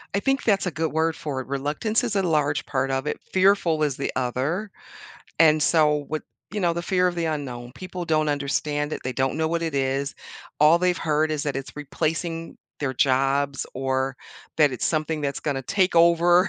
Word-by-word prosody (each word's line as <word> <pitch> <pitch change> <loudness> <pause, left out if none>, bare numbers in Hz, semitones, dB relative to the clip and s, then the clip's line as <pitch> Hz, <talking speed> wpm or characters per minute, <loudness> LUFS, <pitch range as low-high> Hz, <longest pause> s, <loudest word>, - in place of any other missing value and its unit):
I - - +2
think 270 +5 0
that's 200 -4 +2
a - - -1
good 160 +2 -2
word 160 +1 +1
for 140 -5 -4
it, 130 - -11
reluctance 150 - -1
is 230 -4 -2
a 195 - +3
large 150 -4 +1
part 135 -1 -1
of 135 +2 -1
it, - - -2
fearful 185 -4 +3
is 145 -3 0
the 140 - -2
other. 135 - -1 0.7
And 155 -2 +5
so, 150 -2 +3
with 155 +1 -3 0.3
you 210 - -2
know, 175 -2 +2
the 170 +1 -3
fear 180 0 +2
of 180 - 0
the 170 -1 -1
unknown, 125 -6 -4
people 185 0 -6
don't 155 -2 +1
understand 145 +1 -1
it, - - -3
they 130 - -2
don't 130 +2 0
know 160 0 0
what 170 +1 -1
it 165 -3 -2
is. 135 +1 -1 0.4
All 155 +3 +6
they've 180 0 +2
heard 155 0 +1
is 150 -2 -1
that 145 -2 -2
it's 135 +1 -7
replacing 165 +3 -3 0.2
their 135 -3 -1
jobs 135 +2 +1
or 130 0 -1 0.4
that 150 -3 +4
it's 125 - -2
something 155 0 -1
that's 140 -1 -2
gonna 140 -3 -2
take 190 +7 +1
over. 170 +2 +5
155 Hz, 205 wpm, -24 LUFS, 140-170 Hz, 0.7 s, All